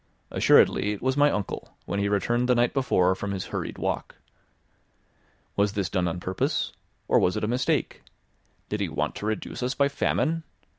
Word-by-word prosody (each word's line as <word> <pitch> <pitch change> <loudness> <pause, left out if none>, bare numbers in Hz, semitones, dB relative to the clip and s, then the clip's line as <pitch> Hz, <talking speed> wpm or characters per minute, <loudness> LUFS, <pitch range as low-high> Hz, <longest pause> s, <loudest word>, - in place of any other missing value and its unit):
Assuredly, 105 - +4
it 100 - -8
was 130 0 +1
my 145 0 +5
uncle, 105 -8 -4
when 100 - -2
he 100 0 +1
returned 120 +5 +1
the 125 - +5
night 120 0 +2
before 95 -9 +3
from 100 +2 -5
his 95 - -3
hurried - - -3
walk. - - -3 1.4
Was 100 0 +2
this 100 -3 -2
done 90 -2 +1
on 85 +1 -2
purpose? 95 +1 -1 0.4
Or - - +4
was 90 - +2
it - - -3
a - - +1
mistake? 125 +3 0 0.7
Did - - -3
he - - -1
want - - -1
to 105 - -4
reduce 110 +3 -3
us 125 +2 -1
by 140 0 +3
famine? 160 +3 0
105 Hz, 185 wpm, -26 LUFS, 95-125 Hz, 1.4 s, my